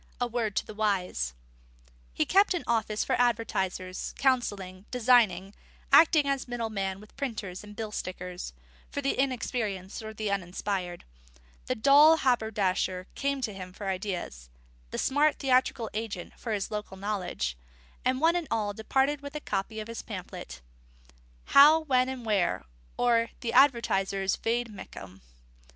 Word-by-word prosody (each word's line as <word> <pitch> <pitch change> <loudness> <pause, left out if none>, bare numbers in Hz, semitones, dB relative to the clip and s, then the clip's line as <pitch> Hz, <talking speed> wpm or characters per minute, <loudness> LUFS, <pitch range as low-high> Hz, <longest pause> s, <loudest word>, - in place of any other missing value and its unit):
A 245 - +1
Word 230 -3 -2
to - - 0
the - - -9
Wise._ 190 - -1 0.8
He - - 0
kept 395 0 +4
an 345 - -2
office 220 -2 0
for - - -1
advertisers, 190 -6 -1
counselling, 205 -8 0
designing, 220 -6 +3 0.4
acting 310 -2 +7
as 275 -1 -1
middleman 215 -6 -3
with 210 +1 -16
printers 215 -9 -4
and 210 0 -11
bill 220 -1 -5
stickers, 180 - -5 0.4
for - - -4
the 275 - +1
inexperienced 230 -7 -2
or 220 0 -6
the 215 -1 -3
uninspired: 185 -1 -3 0.6
the - - 0
dull 290 +7 +7
haberdasher 205 -8 0
came 280 -1 -1
to 220 -4 -2
him 185 -1 -8
for 200 +1 -7
ideas, 180 - -4 0.4
the - - -5
smart 290 +3 +2
theatrical 255 -3 +2
agent 210 -4 -5
for 230 - -6
his 205 -2 -2
local 210 -2 -5
knowledge; 190 - -2 0.5
and 255 +1 +1
one 330 +3 +4
and 345 -3 -1
all 210 -2 -1
departed 270 +7 0
with 285 +1 -8
a - - -2
copy 210 -3 -3
of 215 - -6
his 230 0 -6
pamphlet: 180 - -8 0.9
_How, 310 +3 +7
When, 255 -3 +3
and 255 -3 -6
Where; 195 - +1 0.3
or, 230 -1 +3
the 230 - -2
Advertiser's 200 -7 +3
Vade 230 0 -1
Mecum. 95 - -10
215 Hz, 145 wpm, -28 LUFS, 190-255 Hz, 0.9 s, acting